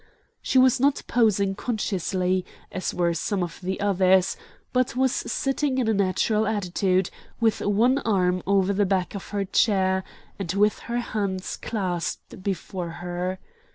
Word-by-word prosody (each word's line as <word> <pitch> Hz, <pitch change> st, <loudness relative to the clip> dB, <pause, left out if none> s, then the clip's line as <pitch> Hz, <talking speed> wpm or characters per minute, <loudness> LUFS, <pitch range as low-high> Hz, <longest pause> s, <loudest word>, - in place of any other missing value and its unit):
She -, -, 0 dB
was 255 Hz, -1 st, +5 dB
not 280 Hz, +2 st, +2 dB
posing 205 Hz, -5 st, +2 dB
consciously, 185 Hz, -4 st, -1 dB, 0.3 s
as 185 Hz, -, -2 dB
were 170 Hz, -1 st, +1 dB
some 185 Hz, +3 st, -1 dB
of 170 Hz, -2 st, -6 dB
the 190 Hz, +1 st, -3 dB
others, 190 Hz, -2 st, +3 dB, 0.4 s
but 250 Hz, -1 st, +1 dB
was 260 Hz, 0 st, +2 dB
sitting 270 Hz, +1 st, -1 dB
in 250 Hz, -3 st, +1 dB
a 220 Hz, -, +3 dB
natural 210 Hz, +2 st, +1 dB
attitude, 190 Hz, -3 st, 0 dB, 0.3 s
with 225 Hz, -2 st, +2 dB
one 235 Hz, +7 st, +3 dB
arm 185 Hz, -6 st, +1 dB
over 195 Hz, 0 st, +3 dB
the 200 Hz, 0 st, +2 dB
back 185 Hz, -2 st, 0 dB
of 200 Hz, -, -7 dB
her 200 Hz, -1 st, -1 dB
chair, 190 Hz, -2 st, +2 dB, 0.4 s
and 180 Hz, -4 st, -2 dB
with 210 Hz, +2 st, +2 dB
her 240 Hz, -, 0 dB
hands 200 Hz, -5 st, -3 dB
clasped 185 Hz, -3 st, -4 dB
before 185 Hz, -2 st, -3 dB, 0.2 s
her. 180 Hz, +1 st, -2 dB
195 Hz, 150 wpm, -25 LUFS, 185-220 Hz, 0.4 s, was